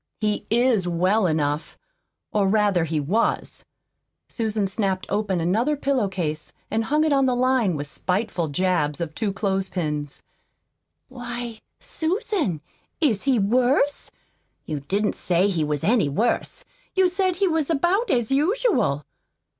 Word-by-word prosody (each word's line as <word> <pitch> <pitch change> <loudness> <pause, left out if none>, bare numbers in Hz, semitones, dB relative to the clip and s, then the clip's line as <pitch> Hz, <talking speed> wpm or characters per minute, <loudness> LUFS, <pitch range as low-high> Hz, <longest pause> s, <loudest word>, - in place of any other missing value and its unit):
"He 210 -1 -1
is 230 -5 +3
WELL 185 +4 +2
ENOUGH 150 -1 -1 0.6
or, 205 -2 +2
rather 200 -4 +2
he 155 -1 -1
WAS." 190 +11 0 0.6
Susan 220 -3 -1
snapped 195 -1 -1
open 200 -3 0
another 220 - +1
pillow 270 -6 +1
case 155 -5 -3 0.2
and 225 +1 0
hung 300 +5 +2
it 310 -2 +2
on 275 -1 +3
the 250 - +2
line 250 -7 +2
with 145 0 -3
spiteful 180 +3 -2
jabs 150 -2 0
of 165 -2 -4
two 210 +4 -1
clothespins. 185 -7 -2 0.8
"Why, 240 -3 -6 0.2
Susan, 320 - -1 0.4
is 260 - +1
he 270 -3 +3
worse? 255 +7 +2 0.6
You 150 -2 -3
didn't 200 +9 -1
say 180 +2 +1
he 175 -6 0
was 150 -1 -2
any 215 -9 +3
worse. 220 +12 -1 0.3
You 380 -1 +5
said 370 0 0
he 390 +2 +1
was 320 -3 0
about 350 - +1
as 240 0 +1
usual." 285 - +1
210 Hz, 140 wpm, -24 LUFS, 175-260 Hz, 0.8 s, You